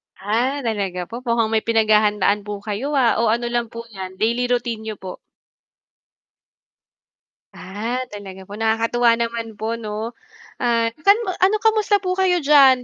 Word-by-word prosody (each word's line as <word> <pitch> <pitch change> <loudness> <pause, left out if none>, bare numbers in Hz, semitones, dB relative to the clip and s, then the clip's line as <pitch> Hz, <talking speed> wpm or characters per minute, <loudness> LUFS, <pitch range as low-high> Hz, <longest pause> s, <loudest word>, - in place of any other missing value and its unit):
Ah, 245 +8 -1
talaga 195 -5 -2
po, 235 - -6
mukhang 230 -1 +1
may 220 - +3
pinaghahandaan 210 -2 +3
po 210 - -3
kayo, 215 +8 -2
ah. 230 - +4
O, 235 - +2
ano 240 +1 -2
lang 240 -1 0
po 230 - -6 0.2
'yan, 190 -1 -7
daily 235 +3 +1
routine 240 -2 -1
niyo 215 - -4
po? 185 -2 -9 2.4
Ah, 225 +7 -4
talaga 195 -2 -9
po. 205 +3 -10
Nakakatuwa 230 +1 +2
naman 230 -1 -3
po 225 +2 -3
'no. 215 +1 -4 0.5
Ah, 230 -2 +1
san 400 +6 +6 0.2
ano, 385 +3 +4
kamusta 435 -2 +3
po 365 - -1
kayo 360 -3 +2
diyan, 275 -3 +6
230 Hz, 150 wpm, -21 LUFS, 210-245 Hz, 2.4 s, san